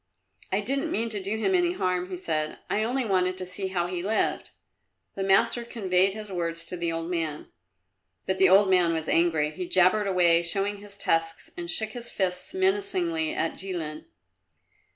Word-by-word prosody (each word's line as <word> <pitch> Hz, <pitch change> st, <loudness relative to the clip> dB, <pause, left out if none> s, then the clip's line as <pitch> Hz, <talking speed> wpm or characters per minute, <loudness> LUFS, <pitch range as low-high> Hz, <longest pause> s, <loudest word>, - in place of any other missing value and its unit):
"I -, -, +1 dB
didn't 275 Hz, +1 st, -1 dB
mean 230 Hz, +2 st, 0 dB
to 210 Hz, -3 st, -4 dB
do 200 Hz, +3 st, -2 dB
him 380 Hz, +12 st, 0 dB
any 355 Hz, -1 st, +2 dB
harm," 180 Hz, -, -1 dB
he 185 Hz, -, -5 dB
said. 155 Hz, -3 st, -2 dB
"I 210 Hz, -, +1 dB
only 245 Hz, +3 st, 0 dB
wanted 185 Hz, -2 st, +1 dB
to 185 Hz, -, -4 dB
see 185 Hz, +2 st, -4 dB
how 180 Hz, -2 st, -1 dB
he 175 Hz, 0 st, -3 dB
lived." 210 Hz, +4 st, 0 dB, 0.6 s
The 195 Hz, -, -5 dB
master 230 Hz, +5 st, +3 dB
conveyed 195 Hz, -4 st, +1 dB
his 210 Hz, -2 st, -7 dB
words 165 Hz, -2 st, -2 dB
to 180 Hz, -, -6 dB
the 170 Hz, -1 st, -1 dB
old 165 Hz, 0 st, -3 dB
man. 165 Hz, -4 st, -3 dB, 0.8 s
But 190 Hz, 0 st, -1 dB
the 190 Hz, -, +6 dB
old 195 Hz, +2 st, +6 dB
man 180 Hz, -3 st, +4 dB
was 160 Hz, -1 st, -3 dB
angry. 160 Hz, -3 st, +2 dB
He 180 Hz, +3 st, -5 dB
jabbered 185 Hz, +4 st, +4 dB
away, 175 Hz, -3 st, +4 dB
showing 195 Hz, +4 st, 0 dB
his 200 Hz, 0 st, -11 dB
tusks, 165 Hz, -4 st, -1 dB
and 170 Hz, -1 st, -6 dB
shook 215 Hz, +5 st, -1 dB
his 240 Hz, 0 st, -7 dB
fists 180 Hz, -2 st, -2 dB
menacingly 375 Hz, -5 st, +1 dB
at 375 Hz, -, -1 dB
Jilin. 170 Hz, -5 st, -5 dB
190 Hz, 185 wpm, -26 LUFS, 175-215 Hz, 0.8 s, the